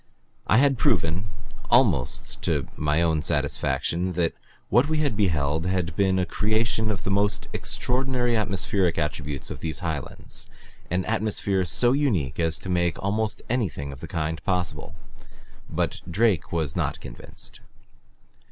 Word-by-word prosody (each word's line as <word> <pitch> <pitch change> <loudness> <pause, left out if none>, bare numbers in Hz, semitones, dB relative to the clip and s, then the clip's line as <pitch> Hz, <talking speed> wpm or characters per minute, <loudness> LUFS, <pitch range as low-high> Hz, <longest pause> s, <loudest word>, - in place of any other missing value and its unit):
I 105 - +5
had 135 -1 +4
proven, 85 +4 +2 0.4
almost 70 - +2
to - - 0
my 75 +2 +2
own 80 -2 +2
satisfaction, 75 +5 0
that 85 -1 +1 0.4
what 130 +5 +4
we 155 - +1
had 145 -7 +1
beheld 80 -4 +1
had 90 -3 0
been 95 -1 +3
a 90 - +2
creation 110 +3 +1
of 100 -4 -2
the 100 +1 +1
extraordinary 125 -1 0
atmospheric 100 -4 +1
attributes 75 -2 -2
of - - -6
these 80 -2 -3
highlands, 75 -4 -3 0.4
an 90 +2 0
atmosphere 105 -3 0
so 120 +8 +4
unique 105 - +1
as 80 -2 +2
to - - -9
make 85 -2 +1
almost 105 +2 -1
anything 90 - -1
of 70 - -9
the - - -7
kind 80 0 -2
possible. 90 -4 -2 0.7
But - - -1
Drake 100 -1 +2
was 80 -4 -1
not - - -1
convinced. - - -9
90 Hz, 140 wpm, -25 LUFS, 80-110 Hz, 0.7 s, I